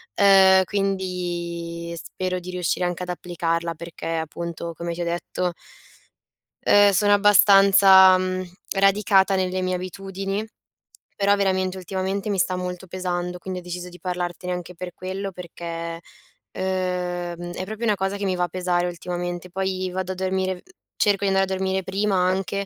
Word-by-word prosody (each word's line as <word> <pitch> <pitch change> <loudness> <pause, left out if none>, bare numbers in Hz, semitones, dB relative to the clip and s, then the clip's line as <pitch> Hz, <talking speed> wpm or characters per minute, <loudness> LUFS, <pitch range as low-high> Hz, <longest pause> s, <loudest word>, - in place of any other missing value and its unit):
ehm, 190 -1 +6
quindi 175 -3 -3
spero 185 +2 -4
di 180 +1 -8
riuscire 180 0 -1
anche 175 0 -2
ad 180 - -7
applicarla 170 -1 -2
perché 170 +2 -8
appunto 170 +1 -5
come 170 +1 -4
ti 170 - -5
ho - - -1
detto 175 +1 -2 1.2
ehm, 205 0 +7
sono 205 +1 +3
abbastanza, 195 -2 +7
mhmm, 185 0 -2 0.3
radicata 195 0 +4
nelle 185 0 -1
mie 185 0 0
abitudini, 195 +2 -4 0.7
però 200 0 +3
veramente, 190 -2 0
ultimamente 190 +2 -3
mi 200 - 0
sta 185 0 +1
molto 180 0 -5
pesando, 180 -1 -3
quindi 185 +1 -5
ho - - -10
deciso 180 0 -6
di 180 0 -14
parlartene 180 0 -3
anche 180 0 -6
per 180 +1 -7
quello, 190 +2 -5
perché, 170 -1 -6 0.5
ehm, 180 -2 -3
è 185 - -4
proprio 220 +3 -5
una 215 -2 +3
cosa 195 0 -2
che 200 - -5
mi 185 -1 0
va 180 - +1
a - - -6
pesare 180 0 0
ultimamente, 175 0 -5
poi 185 0 -2
vado 185 0 -3
a - - -10
dormire 185 0 -1 0.3
cerco 205 -1 +2
di - - +2
andare 195 0 +3
a - - -11
dormire 190 0 -1
prima 195 +2 0
anche, 190 +2 0
185 Hz, 160 wpm, -23 LUFS, 175-190 Hz, 1.2 s, ehm